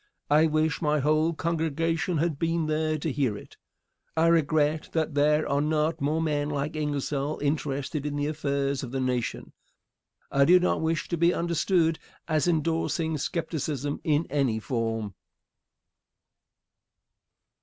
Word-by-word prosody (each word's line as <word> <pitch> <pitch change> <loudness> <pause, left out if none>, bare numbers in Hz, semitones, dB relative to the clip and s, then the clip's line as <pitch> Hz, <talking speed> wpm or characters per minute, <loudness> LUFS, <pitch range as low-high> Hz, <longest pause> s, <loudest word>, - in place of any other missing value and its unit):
I 155 +2 +5
wish 155 0 0
my 150 -1 +2
whole 155 +3 +2
congregation 165 +1 -1
had 155 -2 0
been 165 0 0
there 155 0 0
to 155 +1 -2
hear 130 -7 0
it. - - -14 0.6
I 160 - +4
regret 155 -1 +2
that 160 -1 0
there 150 +2 +3
are 140 0 +1
not 155 +1 0
more 150 +3 +1
men 145 -2 0
like 145 +1 -2
Ingersoll 145 -1 -2
interested 145 0 -2
in 145 -1 -3
the 145 0 -1
affairs 140 -2 -1
of 130 - -6
the 135 +2 -3
nation. 125 -2 -2 0.8
I 140 - +4
do 180 +4 +7
not 180 - +1
wish 160 0 -1
to 170 - -1
be 170 +2 +3
understood 170 0 +1 0.3
as 155 0 +1
indorsing 160 -1 0
skepticism 150 -3 -3
in 155 +1 +1
any 135 -6 +1
form. 115 -3 -2
150 Hz, 140 wpm, -27 LUFS, 140-160 Hz, 0.8 s, do